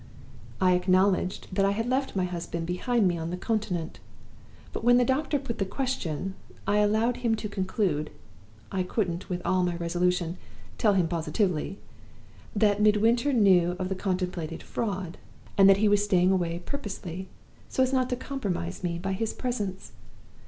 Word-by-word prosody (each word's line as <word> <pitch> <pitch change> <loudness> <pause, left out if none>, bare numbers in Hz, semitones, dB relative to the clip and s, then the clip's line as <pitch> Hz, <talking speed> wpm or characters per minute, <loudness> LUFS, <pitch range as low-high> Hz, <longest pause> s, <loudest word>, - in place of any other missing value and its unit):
I 185 -1 +4
acknowledged 185 +1 +2
that 195 - +2
I 195 - +4
had 225 +3 -2
left 265 -1 0
my 190 - +1
husband 170 -2 -3
behind 200 +5 +1
me 175 -2 0
on 165 +1 -3
the 180 - -3
Continent; 185 -6 -2 0.7
but - - -4
when 245 +1 +6
the 245 - +4
doctor 290 +3 +1
put 265 -4 -5
the - - +2
question, 190 - -3 0.3
I 205 - +2
allowed 220 +4 +2
him 235 -2 +1
to 215 - -4
conclude 185 -6 -1 0.6
I 190 - 0
couldn't, 180 -2 -2
with 180 -1 -3
all 185 0 +2
my 175 -1 0
resolution, 175 0 0 0.4
tell 210 -2 +4
him 180 -3 +3
positively! 175 +2 -1 0.8
that 205 0 +3
Midwinter 225 +6 +4
knew 185 -7 +4
of 185 -1 -3
the - - 0
contemplated 180 -4 -3
Fraud, 190 -6 -3 0.4
and 195 -1 +7
that 195 - +7
he 215 +1 +3
was 205 0 +4
staying 185 -3 +3
away 175 -2 -1
purposely, 190 - -5 0.4
so 260 - +2
as 260 +1 0
not 255 -1 +2
to 250 - 0
compromise 200 -10 -4
me 170 -1 -1
by 190 +3 -2
his 220 +3 -2
presence. 210 -7 -3
190 Hz, 165 wpm, -27 LUFS, 180-220 Hz, 0.8 s, and